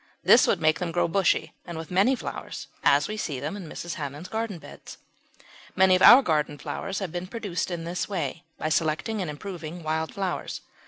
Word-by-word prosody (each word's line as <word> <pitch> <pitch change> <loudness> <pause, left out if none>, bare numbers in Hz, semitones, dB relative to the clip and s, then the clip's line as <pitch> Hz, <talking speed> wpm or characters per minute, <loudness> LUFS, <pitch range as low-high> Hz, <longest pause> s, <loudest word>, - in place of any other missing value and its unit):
This - - +7
would - - +2
make 155 0 +2
them 175 -2 -2
grow 175 - +1
bushy 190 +1 +1
and 170 -2 -7
with 160 +1 -7
many 200 +9 +4
flowers, - - -6 0.2
as 145 +2 +4
we 215 - -4
see 150 -10 -3
them 150 +8 -4
in 185 -6 -8
Mrs. 175 +2 -5
Hammond's 145 +5 -6
garden 220 -4 -3
beds. - - -12 0.8
Many 190 0 +5
of 185 - 0
our 240 +7 +10
garden 150 -4 0
flowers 190 +6 -4
have 190 -5 -3
been 175 +2 -4
produced 205 -5 -3
in 170 -2 -4
this 175 +2 -3
way, 175 -3 -3
by 155 - -2
selecting 165 +7 0
and 175 - -3
improving 170 +1 -7
wild 160 +1 -1
flowers. 190 -3 -3
175 Hz, 200 wpm, -26 LUFS, 155-195 Hz, 0.8 s, our